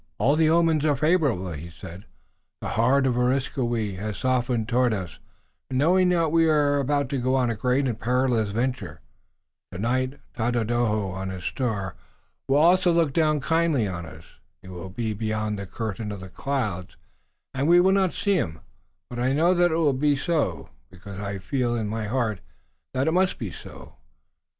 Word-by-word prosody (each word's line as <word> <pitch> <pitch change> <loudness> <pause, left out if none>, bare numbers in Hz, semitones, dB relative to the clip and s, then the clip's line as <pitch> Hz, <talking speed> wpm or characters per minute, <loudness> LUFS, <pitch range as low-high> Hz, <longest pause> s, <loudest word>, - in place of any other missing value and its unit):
"All 130 +8 +3
the 155 0 +3
omens 165 -2 +3
are 150 -2 +3
favorable," 140 - +1
he 80 +2 -7
said. 85 +3 -11 0.5
"The - - -5
heart 130 +5 +2
of 130 - +2
Areskoui 120 -5 0
has 105 -1 -4
softened 125 -2 0
toward 125 -1 +2
us, 95 -5 -7 0.5
knowing 175 +8 +3
that 165 -3 +2
we 165 0 +4
are 145 -2 +3
about 140 0 0
to 140 -2 -1
go 130 +2 +1
on 125 -3 +2
a - - -2
great 125 +5 +1
and 115 -3 -3
perilous 125 -3 +1
venture. 105 - -3 0.7
Tonight 130 +8 -1 0.2
Tododaho 115 -3 0
on 95 +1 -5
his 95 -2 -7
star 105 -7 -2 0.5
will 135 - +3
also 175 +3 +5
look 165 -4 +2
down 155 -2 +2
kindly 160 -6 +1
on 85 -3 -5
us. 80 +1 -12 0.4
He 95 - -11
will 90 +1 -7
be 110 +3 -3
beyond 110 -1 -2
the 100 - -6
curtain 110 0 -4
of 100 - -6
the 95 - -9
clouds, 105 -7 -3 0.6
and 135 +2 -1
we 175 +1 +6
will 185 +2 +4
not 190 -2 +2
see 200 - 0
him, 80 - -3 0.5
but 120 - -7
I 130 +2 +1
know 165 +5 +3
that 175 -1 +3
it - - +1
will 155 -4 +3
be 145 +2 +2
so, 135 - -1 0.2
because 95 +2 -10
I 100 -1 -4
feel 120 +5 -1
in 110 -2 -2
my 110 0 -3
heart 110 -4 -1 0.6
that 130 +3 +1
it - - +3
must 185 +2 +2
be 105 -6 -5
so. - - -12
125 Hz, 180 wpm, -25 LUFS, 105-145 Hz, 0.7 s, we